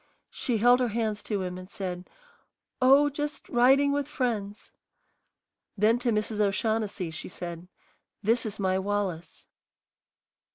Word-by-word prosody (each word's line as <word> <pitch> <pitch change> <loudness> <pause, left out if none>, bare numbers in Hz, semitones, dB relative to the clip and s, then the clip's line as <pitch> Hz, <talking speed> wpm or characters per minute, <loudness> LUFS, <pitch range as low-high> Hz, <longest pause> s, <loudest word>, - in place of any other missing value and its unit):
She 240 -3 -1
held 245 +3 +5
her 250 - +2
hands 220 -2 -2
to 205 -3 -2
him 180 0 -5
and 185 0 -11
said, 180 -3 -6 0.7
"Oh, 275 +3 +6
just 290 0 -4
riding 270 +4 +4
with 285 -1 -1
friends." 225 -7 -3 1.1
Then 220 +4 +3
to 245 0 0
Mrs. 215 -1 -1
O'Shaughnessy 210 -3 0
she 160 - -7
said, 175 -1 -7 0.6
"This 230 +4 +2
is 215 0 -6
my 190 -1 +1
Wallace." 190 -4 -3
215 Hz, 130 wpm, -27 LUFS, 190-245 Hz, 1.1 s, Oh